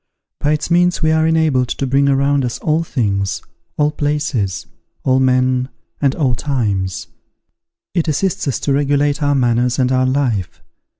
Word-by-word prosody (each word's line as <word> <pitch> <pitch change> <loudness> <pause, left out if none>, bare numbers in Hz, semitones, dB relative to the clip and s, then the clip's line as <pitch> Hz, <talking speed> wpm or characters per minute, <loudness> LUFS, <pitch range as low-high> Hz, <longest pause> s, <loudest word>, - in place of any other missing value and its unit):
By 145 +1 +1
its 155 +3 -3
means 175 0 +2
we 155 - +3
are 160 0 +2
enabled 155 -6 +2
to 135 - -2
bring 140 +2 +2
around 140 0 +2
us 120 -1 -2
all 160 +1 0
things, 100 - -1 0.4
all 150 0 +2
places, 145 - -2 0.4
all 130 0 +2
men, 130 0 +2 0.3
and 140 -1 +2
all 135 -6 +1
times. 105 -9 -2 0.9
It 170 -3 0
assists 170 +4 -1
us 135 - -1
to 140 - 0
regulate 145 +1 +1
our 145 -1 +2
manners 120 -1 +1
and 130 -1 +1
our 130 0 +2
life. 125 -9 -1
140 Hz, 160 wpm, -17 LUFS, 125-150 Hz, 0.9 s, we